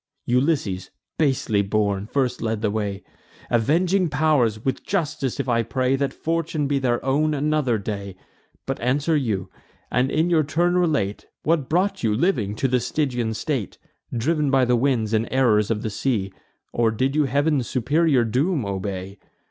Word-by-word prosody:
Ulysses, 125 - 0 0.3
basely 130 -8 +2
born, 100 0 0
first 125 -1 -1
led 110 -1 -2
the 105 - +1
way. 100 -2 -3 0.5
Avenging 170 - +2
pow'rs! 145 -7 +2
with 135 - -1
justice 145 - -2
if 135 - -2
I 115 -2 +2
pray, 130 +3 0
That 135 -1 -1
fortune 165 -1 -2
be 140 0 +1
their 120 -2 0
own 150 +3 +2
another 145 -4 +1
day! 100 -2 -5 0.5
But - - -3
answer 145 +6 +1
you; 105 -10 -1 0.4
and 125 +1 +2
in 160 +4 +1
your 165 -2 +4
turn 170 +4 +1
relate, 150 - 0 0.2
What 155 -4 +1
brought 185 +5 +1
you, 110 -3 +1
living, 110 - 0
to 135 - 0
the 125 0 +2
Stygian 125 -3 -1
state: 130 - -3 0.3
Driv'n 150 +5 0
by 135 -1 +4
the 125 0 +3
winds 120 -4 +1
and 110 +1 +1
errors 115 -6 +3
of 110 -1 -1
the 110 - -2
sea, 100 -5 -1 0.4
Or 115 -1 +2
did 130 +6 -1
you 155 -1 +3
Heav'n's 140 0 +1
superior 140 +1 +2
doom 130 - 0
obey? 95 0 -4
130 Hz, 165 wpm, -23 LUFS, 110-150 Hz, 0.5 s, your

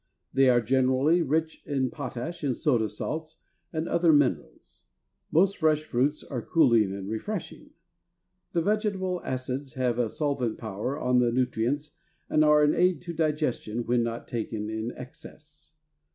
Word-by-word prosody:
They 135 -1 +5
are 120 -1 +4
generally 130 +7 +3
rich 160 +1 -1
in 135 -4 -1
potash 145 +5 -6
and 135 -4 0
soda 120 -7 +1
salts 155 +8 -5 0.3
and 160 0 -2
other 170 -1 +3
minerals. 130 - 0 0.5
Most 190 +5 +3
fresh 155 -2 +2
fruits 145 +1 0
are 125 -5 -5
cooling 115 - +3
and 100 0 -6
refreshing. 110 - -5 0.8
The 170 -2 +1
vegetable 195 -3 0
acids 130 +1 -4
have 125 -2 0
a 120 -2 +1
solvent 140 -5 -1
power 110 +5 -4
on 125 0 +2
the 120 -1 +3
nutrients 125 +4 -1 0.4
and 155 - +4
are 150 0 +5
an 150 - +4
aid 180 -2 +2
to 175 -1 -6
digestion 150 -8 -1
when 120 0 +2
not 115 0 -4
taken 110 -2 -4
in 110 +2 -3
excess. 150 +4 -13
135 Hz, 150 wpm, -27 LUFS, 120-155 Hz, 0.8 s, They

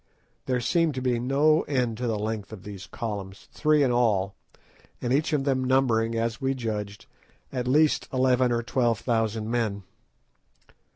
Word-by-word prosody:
There 125 -1 +1
seemed 160 +4 +1
to 130 - -3
be 125 -2 +1
no 145 +6 +3
end 125 -5 0
to 125 - -1
the 110 -2 0
length 105 -1 -4
of 100 -4 -9
these 100 -1 -8
columns—three 115 +8 -1
in 130 - +2
all, 105 -5 +2 0.7
and 125 0 -1
each 150 +3 +1
of 150 -3 +1
them 135 -2 +1
numbering, 120 -3 +2
as 115 0 -2
we 135 0 0
judged, 105 -4 -4 0.5
at 125 -2 -2
least 150 +4 +3
eleven 130 -1 +2
or 120 0 0
twelve 120 -2 +1
thousand 115 -2 -1
men. 110 -4 -1
120 Hz, 160 wpm, -26 LUFS, 110-130 Hz, 0.7 s, no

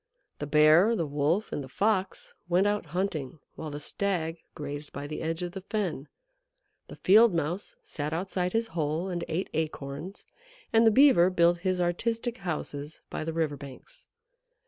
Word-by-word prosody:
The 145 - -4
Bear, 155 +9 +6
the 170 - -1
Wolf, 150 +8 0
and 145 - -3
the 130 - -10
Fox 195 - -1 0.2
went 180 +3 +3
out 205 -4 0
hunting, 160 -4 -3 0.2
while 160 - -6
the 145 0 -6
Stag 165 -1 -1 0.2
grazed 145 0 -6
by 140 - -6
the 155 +1 -5
edge 165 +2 -2
of 175 - -3
the 190 +1 -7
fen. 185 - -3 0.8
The - - -10
Field 215 +1 +5
Mouse 170 +5 -2
sat 150 -1 -4
outside 180 +1 -1
his 225 0 0
hole 160 +2 -1
and 175 -2 -3
ate 180 +4 -2
acorns, 155 +3 -4 0.5
and 225 0 +6
the - - +9
Beaver 250 -7 +6
built 175 -1 +3
his 185 0 0
artistic 230 +7 -1
houses 155 -4 -4
by - - -3
the 165 - -3
river 160 -3 -1
banks. 140 - -11
170 Hz, 170 wpm, -28 LUFS, 150-195 Hz, 0.8 s, the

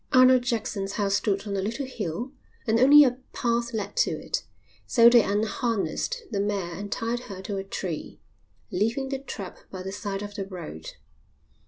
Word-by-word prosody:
Arnold 255 0 +7
Jackson's 220 -5 -2
house 200 -1 0
stood 200 0 +1
on 200 -1 -3
a 195 - 0
little 230 +8 -2
hill 235 - -4 0.3
and 225 -1 +2
only 290 +4 +9
a 255 -2 +1
path 235 0 0
led 205 -3 -4
to - - +4
it, - - -3 0.4
so 235 -2 +6
they 240 -1 +7
unharnessed 225 - -1
the 200 - -1
mare 200 -4 -1
and 200 +4 -6
tied 230 +1 -1
her 195 -2 -6
to 200 0 -3
a 195 - -3
tree, 185 -4 -5 0.5
leaving 230 +8 0
the 270 -1 -2
trap 205 -8 -7
by 185 -1 -7
the 190 - -4
side 200 0 -4
of 205 0 -7
the 195 -1 -4
road. 160 - -8
210 Hz, 180 wpm, -26 LUFS, 195-240 Hz, 0.5 s, only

